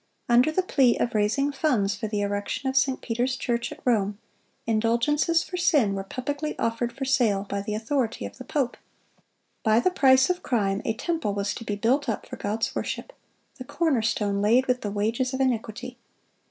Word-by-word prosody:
Under 245 +5 +4
the 370 +4 +1
plea 265 -9 +3
of 240 - -1
raising 225 +7 +1
funds 255 -9 +1
for 200 +3 -4
the 210 -1 -2
erection 205 +6 -2
of 265 - -1
St. 265 -1 +2
Peter's 245 +2 -1
church 235 -2 -2
at - - -10
Rome, 210 -5 +1 0.5
indulgences 235 +9 +2
for 360 - -6
sin 285 - +3
were 195 0 -3
publicly 285 +8 -4
offered 230 +1 -1
for 270 +1 -5
sale 235 -7 +2
by 200 0 -2
the 210 +1 -3
authority 225 - -1
of 100 0 -9
the - - -6
pope. 265 -5 -1 0.8
By 220 0 +4
the 370 - +2
price 265 -5 +5
of 360 0 -1
crime 200 -5 0
a 225 - 0
temple 320 - -2
was 200 0 -1
to 230 - -7
be 210 -2 -3
built 245 +6 +1
up 220 - -3
for - - -8
God's 215 +2 -2
worship,—the 385 - -7
corner 305 -5 +1
stone 205 -3 0
laid 235 +5 +4
with 250 -1 0
the 205 - -3
wages 225 +6 -1
of - - -4
iniquity! 245 -1 -2
235 Hz, 190 wpm, -26 LUFS, 210-270 Hz, 0.8 s, price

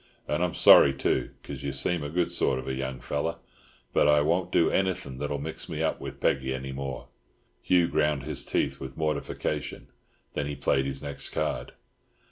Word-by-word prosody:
And 75 +4 0
I'm 90 -2 -1
sorry 70 -1 +8
too, - - 0
'cause - - -7
you 70 - -1
seem 70 +6 0
a 75 - -4
good 85 +2 0
sort 65 - +1
of 65 - -6
a 65 - -1
young 65 -1 -4
feller—but 75 +3 -3
I 75 0 +5
won't 85 +4 +1
do 85 - +3
anything 90 -9 -1
that'll 75 0 -2
mix 80 +3 -6
me 80 0 -2
up 80 - -1
with - - -7
Peggy 65 0 +1
any 65 +1 -5
more." 65 0 -5 0.5
Hugh 90 -2 +3
ground 75 -4 +1
his 75 - -3
teeth - - -1
with 65 0 -8
mortification. 75 -1 -3 0.4
Then 70 - -2
he 75 - -4
played 70 -1 +1
his 70 0 -2
next 70 -1 -2
card. - - -2
70 Hz, 185 wpm, -27 LUFS, 65-80 Hz, 0.5 s, sorry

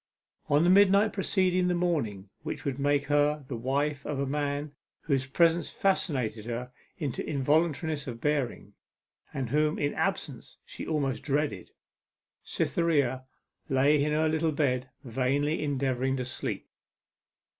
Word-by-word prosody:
On 145 +2 +4
the 175 - +4
midnight 200 +2 +5
preceding 185 -2 +1
the 180 - +1
morning 115 - -1
which - - -5
would 140 -1 -2
make 145 0 +2
her 145 0 +2
the 130 - -4
wife 140 +4 -1
of 145 - -3
a 140 - 0
man 145 +1 -2 0.3
whose 135 -4 0
presence 165 +3 +3
fascinated 125 - 0
her 120 +2 -4 0.3
into 145 -7 -3
involuntariness 155 +1 0
of 115 -2 -5
bearing, 135 -7 -1 0.6
and 130 -4 -4
whom 150 +1 +2
in 145 0 0
absence - - -3
she - - -8
almost 140 -5 -1
dreaded, 145 +1 -1 0.7
Cytherea 140 -6 0 0.4
lay 140 +2 +4
in 150 - 0
her 155 +1 +2
little 160 +1 +1
bed, 130 -4 0
vainly 135 +6 0
endeavouring 135 -2 0
to 125 - -2
sleep. 130 - -4
145 Hz, 135 wpm, -29 LUFS, 130-155 Hz, 0.7 s, midnight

